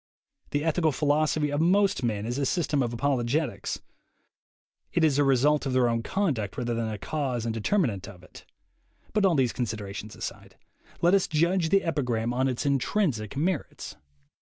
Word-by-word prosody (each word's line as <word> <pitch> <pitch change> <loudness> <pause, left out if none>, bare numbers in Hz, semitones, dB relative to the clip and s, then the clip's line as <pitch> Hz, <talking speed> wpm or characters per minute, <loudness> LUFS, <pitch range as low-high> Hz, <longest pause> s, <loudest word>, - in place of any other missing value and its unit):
The 145 0 -1
ethical 160 0 +2
philosophy 150 +1 +1
of 145 +1 0
most 195 +2 +3
men 110 -4 -1
is 120 +4 -2
a 140 - +1
system 150 -4 0
of 120 -2 -1
apologetics; 130 +2 -1 1.1
it 170 - +1
is 145 -3 +3
a - - +5
result 140 +2 +3
of 130 - -1
their 130 -1 +3
own 115 -1 0
conduct 135 - -1
rather 120 -2 -1
than 115 -1 -2
a 110 - -4
cause 130 -2 -2
and 115 - -1
determinant 115 - 0
of 90 -2 -14
it. - - -14 0.7
But 210 -2 +3
all 175 - +2
these 130 -4 +2
considerations 105 -3 -5
aside. - - -7 0.5
Let 175 +2 +5
us 195 -2 +3
judge 170 +2 +1
the 195 +2 +3
epigram 120 -8 -1
on 130 +2 +1
its 130 +2 -2
intrinsic 135 - 0
merits. 165 +1 -2
140 Hz, 170 wpm, -27 LUFS, 115-160 Hz, 1.1 s, a